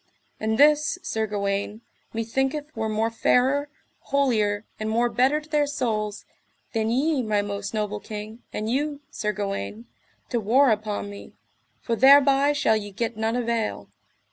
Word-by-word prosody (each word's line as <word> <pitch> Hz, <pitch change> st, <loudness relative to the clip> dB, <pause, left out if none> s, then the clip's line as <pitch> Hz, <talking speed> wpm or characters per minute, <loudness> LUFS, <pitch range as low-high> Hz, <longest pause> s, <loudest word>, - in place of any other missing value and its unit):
And 220 Hz, 0 st, 0 dB
this, 300 Hz, +4 st, +4 dB
Sir 220 Hz, 0 st, -1 dB
Gawaine, 200 Hz, +1 st, -2 dB, 0.3 s
methinketh 270 Hz, +7 st, -2 dB
were 220 Hz, -1 st, -2 dB
more 220 Hz, +1 st, 0 dB
fairer, 265 Hz, +5 st, +2 dB, 0.3 s
holier, 220 Hz, -7 st, +1 dB
and 215 Hz, 0 st, -2 dB
more 235 Hz, +2 st, +2 dB
better 265 Hz, +5 st, +2 dB
to 305 Hz, -, -16 dB
their 300 Hz, -2 st, +1 dB
souls, 215 Hz, -7 st, -2 dB, 0.5 s
than 220 Hz, -1 st, 0 dB
ye, 275 Hz, +4 st, +1 dB
my 210 Hz, -3 st, 0 dB
most 200 Hz, 0 st, -4 dB
noble 210 Hz, -1 st, -2 dB
king, 215 Hz, +3 st, -8 dB
and 215 Hz, -, -3 dB
you, 285 Hz, +4 st, -1 dB
Sir 210 Hz, -, -2 dB
Gawaine, 120 Hz, -, -4 dB, 0.4 s
to 240 Hz, -, 0 dB
war 245 Hz, +5 st, +4 dB
upon 210 Hz, -1 st, -2 dB
me, 200 Hz, -, -11 dB, 0.5 s
for 230 Hz, -, -1 dB
thereby 275 Hz, +2 st, +6 dB
shall 285 Hz, -7 st, +2 dB
ye 205 Hz, -1 st, -3 dB
get 225 Hz, +3 st, -3 dB
none 220 Hz, +2 st, -1 dB
avail. 235 Hz, -2 st, -2 dB
225 Hz, 150 wpm, -25 LUFS, 210-270 Hz, 0.5 s, thereby